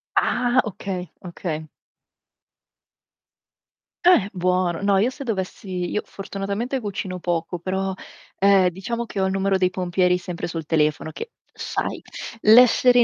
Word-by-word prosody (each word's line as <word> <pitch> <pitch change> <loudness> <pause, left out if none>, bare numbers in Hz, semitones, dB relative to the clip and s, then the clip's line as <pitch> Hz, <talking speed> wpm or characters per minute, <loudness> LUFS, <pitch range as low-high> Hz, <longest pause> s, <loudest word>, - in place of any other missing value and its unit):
Ah, 245 +1 +3
okay, 185 -4 -5 0.2
okay. 160 -3 -5 2.4
Eh, 290 - +5
buono. 180 -1 0
No, 200 -1 +3
io 220 +6 +2
se 275 - -8
dovessi 190 -4 -3
io 210 - 0
fortunatamente 200 +6 -4
cucino 195 -4 -4
poco, 175 0 -2
però, 190 +2 -2 0.5
ehm, 195 -2 +5
diciamo 230 +6 -4
che 200 -3 -3
ho - - +3
il 190 - 0
numero 195 0 +1
dei 185 -1 +3
pompieri 180 -1 +1
sempre 180 -1 -5
sul 165 -2 -5
telefono 155 0 +1
che 465 - -7 0.2
sai, - - -3 0.4
l'essere 245 +2 +7
190 Hz, 130 wpm, -23 LUFS, 180-210 Hz, 2.4 s, l'essere